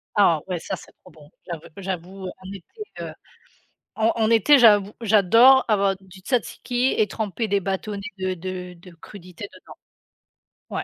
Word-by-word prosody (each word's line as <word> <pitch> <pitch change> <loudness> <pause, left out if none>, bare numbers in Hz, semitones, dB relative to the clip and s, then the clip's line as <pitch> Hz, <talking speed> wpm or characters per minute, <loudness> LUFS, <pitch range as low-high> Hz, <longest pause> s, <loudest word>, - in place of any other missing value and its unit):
Ah 170 -7 +4
ouais 180 -2 -3
ça - - -4
c'est - - -15
trop 185 - -17
bon, 155 -2 -18 0.2
j'av 170 -3 -5 0.2
j'avoue 190 0 -6 0.2
en 190 - -9
été 200 - -13 0.2
heu, - - -6 0.8
en 220 +1 +2
en 220 -2 +1
été 230 +6 +5
j'avoue, 210 -5 +5
j'adore 230 +5 +5
avoir 200 -3 +2
du 190 0 -16
tzatziki 250 +2 -1
et 215 - +3
tremper 215 +2 -3
des 200 0 +2
bâtonnets 195 +2 -4 0.2
de 185 0 -2
de 180 0 -6
de 180 +1 -16
crudité 180 +2 -11
dedans. - - -14 1.0
Ouais, - - -3
195 Hz, 160 wpm, -23 LUFS, 185-220 Hz, 1.0 s, été